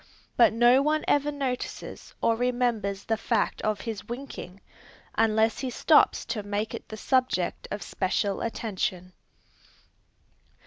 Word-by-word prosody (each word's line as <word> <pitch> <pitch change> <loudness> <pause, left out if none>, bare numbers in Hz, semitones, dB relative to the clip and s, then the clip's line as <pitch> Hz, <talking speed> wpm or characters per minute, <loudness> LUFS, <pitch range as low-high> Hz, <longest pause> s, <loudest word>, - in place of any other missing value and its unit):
But 235 - +6
no 240 +3 +5
one 305 +2 +1
ever 290 +1 +2
notices 270 -3 -5
or 230 - +4
remembers 235 -5 0
the 225 - 0
fact 230 +1 0
of 215 -2 -1
his 225 -1 -6
winking, 240 -7 -7 0.5
unless 220 0 +2
he 260 - -2
stops 300 +5 +4
to 230 -2 -3
make 205 +2 -3
it - - -8
the 215 - -7
subject 255 -7 0
of 205 - -4
special 195 +1 -1
attention. 190 -5 -3
225 Hz, 130 wpm, -27 LUFS, 205-250 Hz, 0.5 s, But